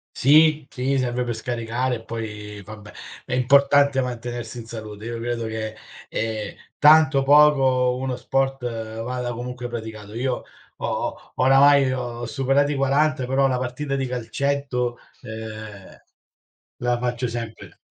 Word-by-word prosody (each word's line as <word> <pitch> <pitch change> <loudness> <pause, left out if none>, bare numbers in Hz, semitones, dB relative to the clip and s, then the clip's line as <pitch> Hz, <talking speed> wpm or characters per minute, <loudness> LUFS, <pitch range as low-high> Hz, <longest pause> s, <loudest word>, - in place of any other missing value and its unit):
Sì, 155 +1 +5
sì 135 +2 -1
serve 125 -1 0
per 120 -1 -3
scaricare 120 +2 -2
e 115 - -9
poi, 105 -2 -6
vabbè, 105 0 -11 0.3
è - - -5
importante 140 +1 +4
mantenersi 120 -1 -5
in 115 - -8
salute. 110 -2 -8
Io 115 -1 -4
credo 115 -1 -3
che, 110 -1 -4 0.3
ehm, 110 -1 -3 0.2
tanto, 155 -1 +6
o - - +1
poco, 135 -3 +5
uno 130 0 -3
sport 135 0 -1 0.4
vada 125 0 -3
comunque 125 +1 -5
praticato. 110 -3 -7
Io 125 +1 -2 0.4
ho - - -3
oramai 135 +1 +5
ho 120 -2 -4
superati 135 +5 +1
40 135 0 +1
però 135 +1 +3
la 130 - 0
partita 130 +3 -3
di 135 -1 -1
calcetto, 125 0 -2 0.2
uhm, 110 -2 -9 0.8
la 120 0 0
faccio 125 0 -2
sempre. 115 -1 -7
125 Hz, 135 wpm, -23 LUFS, 115-135 Hz, 0.8 s, tanto